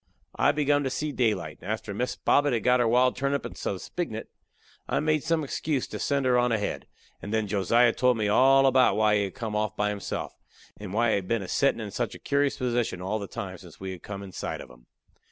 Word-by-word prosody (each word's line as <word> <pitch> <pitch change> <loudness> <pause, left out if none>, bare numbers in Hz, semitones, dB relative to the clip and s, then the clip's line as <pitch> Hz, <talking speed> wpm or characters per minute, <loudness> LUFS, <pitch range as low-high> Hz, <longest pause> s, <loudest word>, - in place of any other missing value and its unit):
I - - +4
begun 145 -1 +2
to 135 - -1
see 150 +3 -2
daylight, 110 - -1
and 100 - -4
after 110 -1 -4
Miss 125 +5 -2
Bobbet 145 -2 +2
had 115 -3 0
got 125 0 +4
her 120 - +3
wild 125 +2 +3
turnip 140 +2 -1
and - - -7
some 100 - -3
spignut, 110 - -5 0.6
I - - +1
made 155 0 +1
some 165 0 0
excuse 145 -1 -2
to - - -6
send 140 -2 0
her 125 -1 +4
on 120 0 +2
ahead, 105 -2 -2 0.3
and 100 - -6
then 110 -1 +1
Josiah 115 +4 +3
told 125 -1 +2
me 105 -1 0
all 135 +5 +5
about 130 -1 +4
why 105 -1 +3
he 100 - +1
had 95 - -8
gone 110 -3 -4
off 105 -1 -1
by 105 0 +1
himself 105 -1 -4
alone, - - -28
and 95 - -8
why 120 +1 +3
he - - +3
had 95 -2 -5
been 115 -1 0
a - - -7
settin' 140 +3 +2
in 105 -2 -6
such 105 - -3
a - - -8
curious 140 0 0
position 120 -6 -1
all 95 +4 -2
the 100 - -6
time - - -6
since - - -14
we 95 0 -5
had 90 - -8
come 100 -1 -7
in 95 - -9
sight - - -4
of 65 - -10
him. - - -19
115 Hz, 250 wpm, -27 LUFS, 105-135 Hz, 0.6 s, all